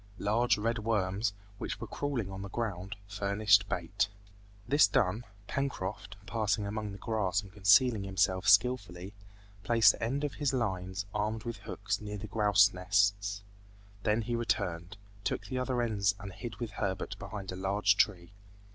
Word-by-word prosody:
Large 115 +4 +2
red 115 +2 -1
worms, 105 -1 0 0.3
which - - -4
were - - -5
crawling 130 -9 -3
on 95 0 -6
the 100 - -6
ground, 100 -3 -4
furnished 105 0 +3
bait. 95 +4 0 0.6
This 145 -4 +6
done, 105 +3 +1 0.2
Pencroft, 105 -7 -4
passing 105 -1 0
among 105 0 -4
the 100 - -8
grass 105 -2 -1
and 95 -2 -14
concealing 105 +3 +5
himself 95 -1 +1
skillfully, 100 -4 +2 0.5
placed 115 0 +5
the - - -11
end 135 +6 -1
of 145 - -1
his 145 -3 -1
lines 95 -5 -2
armed 105 +1 -1
with 115 -1 -5
hooks - - -4
near 105 0 -5
the 105 - -7
grouse 105 -3 +4
nests; 100 +1 +1 0.6
then 110 +2 +1
he 120 +2 -2
returned, 90 -5 -2 0.3
took - - -2
the 130 -1 -3
other 125 -1 0
ends 100 -4 +1
and 100 -1 -8
hid 120 0 -7
with 115 +1 -5
Herbert 95 -2 -3
behind 100 -3 -6
a - - -5
large 100 +2 +2
tree. 95 -4 +1
105 Hz, 160 wpm, -31 LUFS, 95-115 Hz, 0.6 s, This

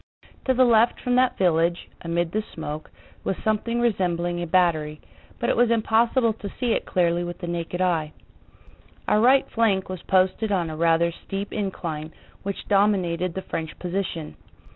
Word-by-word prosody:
To 260 - +2
the 255 +1 +5
left 230 0 +4
from 250 - -1
that 255 0 +3
village, 170 -1 +1
amid 170 0 -1
the 215 - 0
smoke, 155 -1 -6 0.3
was 195 - -1
something 220 +2 0
resembling 175 -6 0
a 175 - -3
battery, 160 -4 +1 0.4
but 240 - -1
it - - +2
was 240 0 +3
impossible 230 +1 +2
to 210 -2 -7
see 245 -2 +1
it - - -2
clearly 175 -1 +1
with 175 0 -5
the 175 - -6
naked 175 +1 -3
eye. 165 -4 +1 1.0
Our 210 - +3
right 260 +3 +5
flank 205 -5 +1
was 185 -2 -5
posted 190 +3 +1
on 175 -5 0
a - - -5
rather 165 +1 +3
steep 195 +4 -6
incline 165 -6 -4 0.3
which 200 0 -5
dominated 185 -4 +1
the 190 - -4
French 160 -1 -5
position. 180 -3 -4
185 Hz, 165 wpm, -24 LUFS, 170-220 Hz, 1.0 s, the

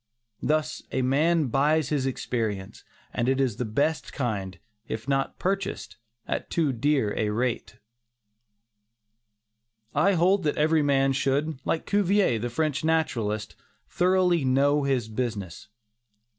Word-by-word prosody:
Thus 155 0 0
a 130 - 0
man 150 +3 +2
buys 150 +4 +2
his 140 -3 0
experience, 110 -7 -3 0.3
and 120 +1 0
it 135 0 +1
is 130 -6 0
the 125 - -2
best 140 +9 -1
kind 100 -7 -3 0.3
if 110 +3 -5
not 135 -1 0
purchased 195 +1 -3 0.3
at - - -3
too 155 -5 +1
dear 135 -3 +1
a 105 - 0
rate. 110 -1 -2 2.2
I 200 - +3
hold 185 +3 +3
that 150 -3 -1
every 155 +1 +3
man 135 -1 +2
should, 140 +2 0
like 160 - 0
Cuvier, 200 - +2
the 120 +2 -3
French 155 +3 -1
naturalist, 115 -10 -1 0.3
thoroughly 180 -3 +2
know 140 +2 +2
his 130 -5 0
business. 110 -6 -4
135 Hz, 130 wpm, -26 LUFS, 120-160 Hz, 2.2 s, I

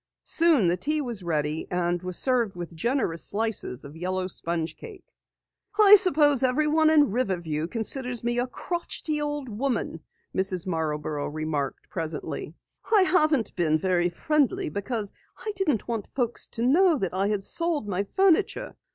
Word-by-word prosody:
Soon 325 - +4
the 175 +1 +1
tea 305 - 0
was 240 -8 -1
ready, 155 -2 -2
and 175 -1 -1
was 185 -1 -1
served 240 -7 +1
with 175 -1 -7
generous 175 - 0
slices 215 - -2
of 140 +2 -11
yellow 185 +2 -2
sponge 170 -2 -2
cake. 415 -6 -11 0.8
"I 415 -1 +10
suppose 300 - +4
everyone 305 +4 +3
in 295 -6 +4
Riverview 175 -9 -1
considers 245 +4 -1
me 240 0 0
a 245 - 0
crotchety 315 0 -4
old 295 -2 -3
woman," 230 -6 -2 0.4
Mrs. 190 -2 0
Marborough 155 -4 -2
remarked 150 -2 -3
presently. 160 -2 -5 0.4
"I 420 -4 +6
haven't 310 - +2
been 155 -4 +2
very 175 +1 +1
friendly 305 - 0
because 205 0 -4 0.3
I 430 - -4
didn't 310 - 0
want 230 -4 -3
folks 240 -3 -1
to 230 - -4
know 320 +4 +4
I 195 +2 0
had 205 -2 -1
sold 335 - 0
my 200 0 -2
furniture. 390 +6 +2
225 Hz, 150 wpm, -26 LUFS, -, 0.8 s, I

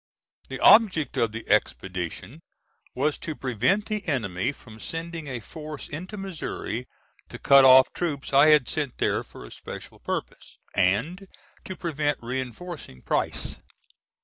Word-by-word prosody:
The - - -5
object 190 -11 +5
of 115 -3 +2
the 115 +1 -8
expedition 95 - -2 0.5
was 145 +4 0
to 155 - -5
prevent 130 - 0
the 215 -2 -3
enemy 115 - -1
from 115 -5 -15
sending 165 +2 -5
a 125 -3 -4
force 150 +5 -8
into 180 +8 -7
Missouri 165 - -5 0.4
to - - -8
cut 140 -1 +6
off 130 0 +7
troops 145 -6 -3
I 140 +3 +7
had 150 -5 +5
sent 145 -5 -3
there - - 0
for - - -12
a - - -13
special - - -9
purpose, - - -5 0.2
and 115 - +1 0.4
to 185 - -6
prevent 150 -4 -1
reinforcing 130 - -6
Price. - - 0
140 Hz, 140 wpm, -26 LUFS, 115-165 Hz, 0.5 s, off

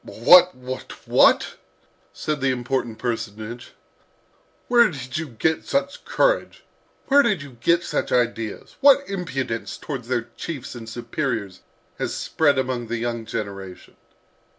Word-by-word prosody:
"What, 180 +10 +6
what, 130 0 -8
what!" - - +4 0.5
said 150 -2 -3
the 135 - +2
important 125 -2 -2
personage. 115 0 -5 0.9
"Where 240 -3 +5
did 130 -5 -7
you 160 - -4
get 150 +6 -1
such 275 0 -2
courage? - - +1 0.5
Where 285 +1 +7
did 210 - 0
you 135 -4 -13
get 170 +6 +3
such - - -2
ideas? 115 -3 -1
What 280 0 +6
impudence 135 - -4
towards 130 -6 -6
their 120 -2 -2
chiefs 140 -7 -6
and 115 -2 -9
superiors 115 -4 -3 0.4
has - - -2
spread 145 -4 +1
among 130 -2 -1
the 120 +1 -2
young 115 -1 -3
generation!" 95 -4 -6
130 Hz, 130 wpm, -23 LUFS, 115-160 Hz, 0.9 s, Where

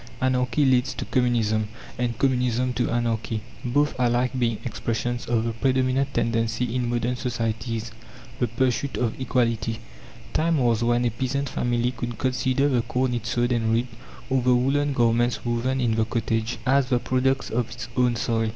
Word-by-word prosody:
Anarchy 130 +1 +2
leads 130 0 +2
to - - -4
Communism, 115 -4 +1 0.3
and 120 -2 -2
Communism 125 -1 +1
to 120 +1 0
Anarchy, 115 -2 -1 0.2
both 145 +4 +1
alike 125 0 +2
being 115 -3 +1
expressions 120 +2 -2
of 115 -2 +1
the 115 0 -2
predominant 130 +2 +1
tendency 115 0 0
in 125 -1 0
modern 120 +1 0
societies, 115 -2 -3 0.5
the 120 - +2
pursuit 130 +3 0
of 120 +1 -1
equality. 115 -3 0 0.6
Time 165 0 +2
was 120 -4 +2
when 120 +1 +2
a 120 - +1
peasant 130 +4 -2
family 120 0 0
could 120 -2 -5
consider 130 +2 +1
the 125 -4 +2
corn 125 +1 -1
it 120 -1 -3
sowed 120 +1 +1
and 115 -2 +1
reaped, 120 +1 0 0.3
or 130 -1 +1
the 125 0 +4
woolen 140 +3 +2
garments 120 0 +2
woven 120 +3 0
in 120 -3 +2
the 110 0 +1
cottage, 115 0 -1
as 135 0 +3
the 125 - +3
products 130 +2 0
of 120 0 0
its 120 - -7
own 125 -1 +3
soil. 115 -1 0
120 Hz, 170 wpm, -25 LUFS, 115-130 Hz, 0.6 s, the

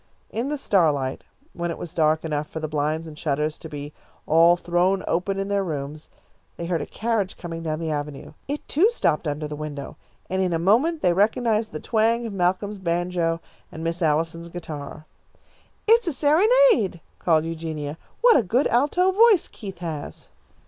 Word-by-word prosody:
In 235 +5 -2
the 295 - -1
starlight, 150 - +1 0.3
when 175 0 -3
it 165 - -4
was 170 - -7
dark 155 -1 +2
enough 150 -1 -2
for 160 - -5
the 155 - -3
blinds 155 +2 -1
and 155 -2 -10
shutters 150 0 -1
to 160 - -9
be 145 0 -7 0.3
all 165 +2 +5
thrown 175 +2 +1
open 195 +3 0
in 195 0 -2
their 200 -1 +1
rooms, 150 -2 -5 0.5
they 170 - -4
heard 170 -2 -1
a - - -5
carriage 220 -4 -1
coming 165 -1 -6
down 155 -1 -2
the 165 -1 -2
avenue. 145 -1 -5
It, 290 +1 -4
too, 360 +10 +4
stopped 170 - 0
under 150 +1 -2
the 150 - -6
window, 145 -2 -6 0.3
and 190 +1 -1
in 180 -2 +1
a - - +2
moment 240 - +2
they 180 - +4
recognised 220 +3 +1
the 155 - -5
twang 230 +4 +1
of 220 - -5
Malcolm's 195 +2 0
banjo 170 -1 -1 0.3
and 160 - -7
Miss 165 +2 -2
Allison's 165 +2 0
guitar. 155 -3 -7 0.8
"It's 460 -2 +5
a 335 - 0
serenade," 335 - +4 0.2
called 160 -2 +2
Eugenia. 160 -2 -5 0.2
"What 480 -1 +7
a - - +5
good 235 +7 +1
alto 300 +10 +3
voice 425 -2 +5
Keith 195 -4 -9
has!" 155 -3 -6
170 Hz, 180 wpm, -24 LUFS, 155-220 Hz, 0.8 s, What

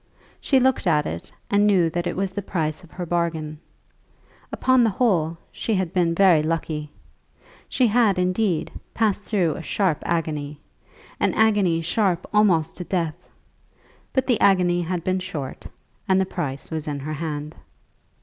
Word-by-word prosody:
She 270 - +3
looked 260 -6 +2
at 150 -3 +3
it, 85 +1 -6 0.2
and 205 +1 +4
knew 185 -5 +4
that 175 +1 -2
it 175 - -3
was 195 0 -1
the 205 +1 -4
price 160 -4 -3
of 175 - -15
her 180 +1 -6
bargain. 160 -3 -2 0.9
Upon 260 -1 +3
the 225 - +4
whole 180 -8 +1
she 225 - -2
had 185 -3 -1
been 170 -2 +2
very 180 -4 +5
lucky. 155 -1 -2 0.8
She 255 - +2
had, 220 -3 +3
indeed, 180 -1 0 0.2
passed 215 -3 +1
through 185 -7 0
a - - -7
sharp 180 -2 0
agony, 150 -3 -2 0.6
an - - +1
agony 205 -7 +3
sharp 185 0 0
almost 180 -7 +3
to 180 - -4
death; 170 -3 -1 1.0
but 260 -1 +1
the 245 -5 +1
agony 180 -3 +4
had 175 0 -3
been 185 +1 0
short, 155 -8 -6 0.4
and 190 0 +4
the 190 - +2
price 145 -8 -5
was 160 -1 -3
in 145 -2 -3
her 155 +3 -4
hand. 150 -1 -5
175 Hz, 160 wpm, -23 LUFS, 160-200 Hz, 1.0 s, very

